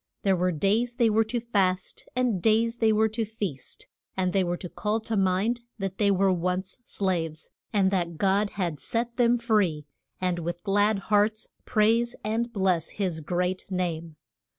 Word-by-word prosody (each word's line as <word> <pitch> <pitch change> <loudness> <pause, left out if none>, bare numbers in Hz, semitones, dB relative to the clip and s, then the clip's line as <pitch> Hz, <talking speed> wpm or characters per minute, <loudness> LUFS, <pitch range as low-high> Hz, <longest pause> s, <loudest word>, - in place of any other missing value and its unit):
There 195 -1 +3
were 180 +1 +1
days 210 +9 +1
they 235 -3 +3
were 220 +1 +4
to 240 +2 -2
fast, 195 -5 -1
and 245 -7 +1
days 225 +3 +2
they 225 -2 +3
were 220 +1 +3
to 225 +2 -2
feast, 205 - -6 0.3
and 185 -1 0
they 195 - +3
were 175 0 -1
to 180 - -7
call 210 +5 -1
to 225 0 -3
mind 195 +5 +1 0.2
that 195 -2 -4
they 205 -2 +4
were 195 -1 +3
once 180 +4 -2
slaves, 165 -7 -2 0.2
and 195 -3 +3
that 170 -4 -1
God 200 +3 +2
had 170 -7 -1
set 235 +6 -3
them 240 -1 +4
free, 205 - +1 0.3
and 180 -1 0
with 175 +1 -4
glad 205 +1 +2 0.2
hearts 210 +1 +2 0.2
praise 230 +3 +2
and 230 +3 -1
bless 185 -6 +1
his 185 -6 -1
great 180 +3 -2
name. 170 -4 -3
195 Hz, 175 wpm, -27 LUFS, 180-220 Hz, 0.3 s, were